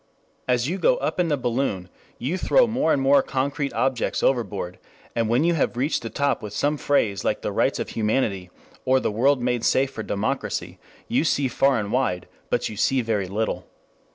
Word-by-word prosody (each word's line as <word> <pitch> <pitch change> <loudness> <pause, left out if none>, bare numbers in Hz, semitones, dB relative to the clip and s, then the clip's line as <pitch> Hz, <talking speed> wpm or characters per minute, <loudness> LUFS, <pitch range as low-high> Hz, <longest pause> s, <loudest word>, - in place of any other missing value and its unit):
As 125 0 +1
you 185 +5 -2
go - - +3
up - - -2
in 180 - +2
the 150 -2 +1
balloon 120 -7 -1 0.3
you 135 +9 -2
throw 245 +7 +4
more 225 -8 +1
and - - +3
more 135 +1 +5
concrete 140 +2 -2
objects 130 -2 0
overboard, 100 -8 -1 0.4
and 115 -2 0
when 120 +5 +3
you 170 +1 +3
have 140 -6 0
reached 140 +3 0
the 115 - -5
top 140 +5 0
with 105 -1 -7
some 145 +7 +1
phrase 115 -10 0
like - - -1
the - - -1
Rights - - +1
of - - -4
Humanity 105 -4 -1 0.3
or 130 +1 +3
the - - -1
World 130 +4 +2
Made 125 -2 0
Safe 135 +1 +2
for 110 - -6
Democracy, 110 +6 -3 0.3
you - - +1
see 145 -4 +1
far 135 +1 +2
and 105 -1 -4
wide, 100 -9 0 0.2
but - - 0
you 110 - -7
see 130 +5 +2
very 110 -5 -1
little. 105 +4 -2
130 Hz, 200 wpm, -24 LUFS, 110-140 Hz, 0.4 s, more